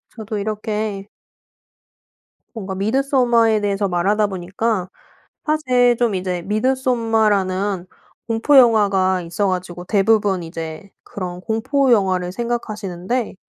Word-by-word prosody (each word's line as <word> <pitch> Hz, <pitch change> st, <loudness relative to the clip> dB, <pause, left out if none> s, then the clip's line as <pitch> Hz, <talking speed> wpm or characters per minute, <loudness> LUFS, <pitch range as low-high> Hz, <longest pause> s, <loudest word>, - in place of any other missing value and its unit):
저도 220 Hz, -1 st, -5 dB
이렇게 210 Hz, -1 st, -3 dB, 1.5 s
뭔가 195 Hz, -4 st, -6 dB
미드소마에 235 Hz, 0 st, +2 dB
대해서 200 Hz, 0 st, 0 dB
말하다 200 Hz, +4 st, +1 dB
보니까 190 Hz, +2 st, -2 dB, 0.6 s
사실 250 Hz, -6 st, +2 dB
좀 235 Hz, -4 st, +1 dB
이제 180 Hz, -2 st, -3 dB
미드소마라는 215 Hz, -5 st, 0 dB, 0.4 s
공포 230 Hz, +5 st, +3 dB
영화가 200 Hz, -6 st, +4 dB
있어 170 Hz, +4 st, -1 dB
가지고 180 Hz, -1 st, -3 dB
대부분 200 Hz, -2 st, +2 dB
이제 165 Hz, +2 st, -7 dB
그런 180 Hz, -2 st, -6 dB
공포 255 Hz, +6 st, 0 dB
영화를 185 Hz, -5 st, +2 dB
생각하시는데. 215 Hz, -1 st, -3 dB
210 Hz, 265 characters per minute, -20 LUFS, 185-230 Hz, 1.5 s, 영화가